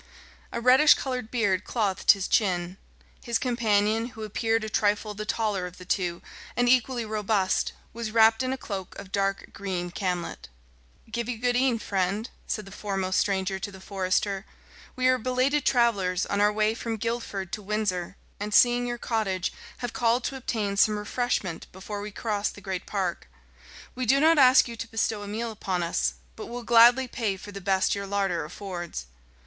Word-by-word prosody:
A - - -3
reddish 260 +5 +7
coloured 250 -4 -4
beard 205 -7 +1
clothed 205 -5 -2
his 195 -2 -4
chin. 180 -3 +1 0.5
His 235 -2 0
companion, 225 -2 +1
who 220 - -5
appeared 225 +1 0
a - - -3
trifle 210 0 0
the 215 +1 -6
taller 210 -5 -1
of 180 - -12
the 180 - -11
two, 175 -2 -1 0.3
and 245 0 +2
equally 245 -1 +2
robust, 210 -3 0 0.2
was 230 -1 -4
wrapped 225 +1 +5
in 255 0 -1
a 265 - -2
cloak 195 -7 -6
of 190 - -10
dark 195 0 -1
green 180 -3 -4
camlet. 180 -2 -3 0.6
"Give 235 +1 -3
you 245 - -2
good 245 +2 +1
e'en, 250 -1 +3
friend," 200 +2 -1 0.2
said 215 - -3
the 195 - -12
foremost 195 -2 -1
stranger 190 -1 0
to 205 - -5
the 190 - -12
forester. 195 +1 -1 0.5
"We 255 -1 +2
are 255 0 +4
belated 255 +4 +1
travellers, 205 -7 +2
on 200 0 -1
our 210 0 +5
way 215 +1 +1
from 230 0 -4
Guildford 215 -4 -3
to 215 - -3
Windsor, 195 -3 -2 0.2
and, 210 +1 -2
seeing 245 0 +5
your 240 0 -3
cottage, 205 -6 -1 0.3
have 240 - -6
called 235 +1 +2
to 270 - -3
obtain 215 -6 -2
some 210 +1 +4
refreshment 210 -5 -2
before 200 +2 -6
we 210 - -5
cross 210 -1 -2
the - - -11
great 190 -3 -5
park. 190 -4 -2 0.7
We 255 -1 -3
do 275 +4 +5
not 320 +1 +5
ask 260 -1 +7
you 235 - -6
to 225 - -5
bestow 225 -1 -1
a 205 - -7
meal 225 +3 -3
upon 190 -4 -2
us, 65 - 0 0.2
but - - -8
will 240 0 -6
gladly 240 +3 +6
pay 220 -6 -2
for 205 +2 -10
the 200 0 -8
best 190 0 +2
your 200 0 -4
larder 195 -4 0
affords." 175 - -6
210 Hz, 185 wpm, -27 LUFS, 195-235 Hz, 0.7 s, reddish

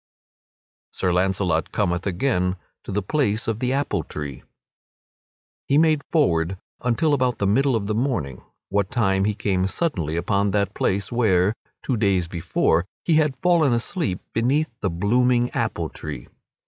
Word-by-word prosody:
[Sidenote: - - -22
Sir 90 -1 0
Launcelot 90 -2 +1
cometh 90 -2 -1
again 90 -2 0 0.3
to - - -7
the 100 +1 -1
place 115 -2 0
of 115 -1 -1
the 125 +1 0
apple 135 - 0
tree] 75 -3 -7 1.3
He 140 - +3
made 155 -2 +4
forward 95 - +2 0.2
until 145 +6 +1
about 130 -3 +1
the 100 - -1
middle 130 +6 +3
of 105 -3 -1
the 105 - -1
morning, 105 - -2 0.3
what 100 -1 0
time 95 -6 +1
he 105 0 0
came 95 -2 0
suddenly 90 - -2
upon 100 +3 +1
that 100 0 0
place 100 -1 -1
where, 105 -5 +3 0.3
two 130 - 0
days 95 -5 +2
before, 85 +1 0 0.2
he 165 -3 +4
had 150 -4 +2
fallen 165 -7 +4
asleep 120 - -2
beneath 135 +6 +1
the 100 - -1
blooming 120 +7 +2
apple - - -2
tree. 75 -6 -7
105 Hz, 155 wpm, -23 LUFS, 90-125 Hz, 1.3 s, made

